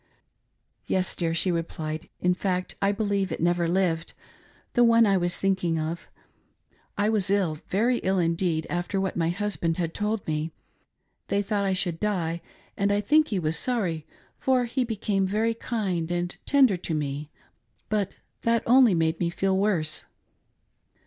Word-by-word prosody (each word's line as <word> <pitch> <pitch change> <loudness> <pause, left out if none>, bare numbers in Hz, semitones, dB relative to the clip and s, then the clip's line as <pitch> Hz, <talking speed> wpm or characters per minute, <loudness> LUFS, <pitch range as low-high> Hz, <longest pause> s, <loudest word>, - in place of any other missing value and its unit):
"Yes 185 -1 0
dear," 165 -2 -1
she 180 +2 +2
replied, 160 -2 -4
"in 180 0 +2
fact 185 0 -2
I 200 0 +3
believe 200 -3 -1
it - - -3
never 175 0 +2
lived 170 -2 0 0.3
— - - -32
the 245 - +5
one 230 -1 +6
I 200 -2 +3
was 175 -1 +1
thinking 185 -4 +1
of. 160 +2 -3 0.9
I 205 +1 +2
was 210 -4 +1
ill, 185 -6 +1
very 235 +6 +2
ill 190 +1 0
indeed, 165 -2 +1
after 175 +3 -2
what 190 -1 -1
my 165 -1 +1
husband 175 -3 -1
had 165 -2 -2
told 210 0 -2
me. 155 +1 -2 0.7
They 200 0 +1
thought 205 -1 0
I 190 - +1
should 175 -3 0
die, 170 -5 -1 0.3
and 200 0 +1
I 205 - +2
think 305 +9 +4
he 205 - -1
was 160 -2 0
sorry, 185 -11 -1 0.3
for 255 -2 +2
he 250 +2 -1
became 205 -4 -1
very 220 +4 +1
kind 195 -8 -2
and 175 0 -2
tender 265 -9 +5
to 170 -2 -3
me, 145 0 -3 0.6
but 205 -3 0 0.3
that 230 -1 +2
only 245 -4 +6
made 160 0 +1
me 170 - +1
feel 190 +2 0
worse. 185 -6 0
190 Hz, 165 wpm, -26 LUFS, 165-210 Hz, 0.9 s, one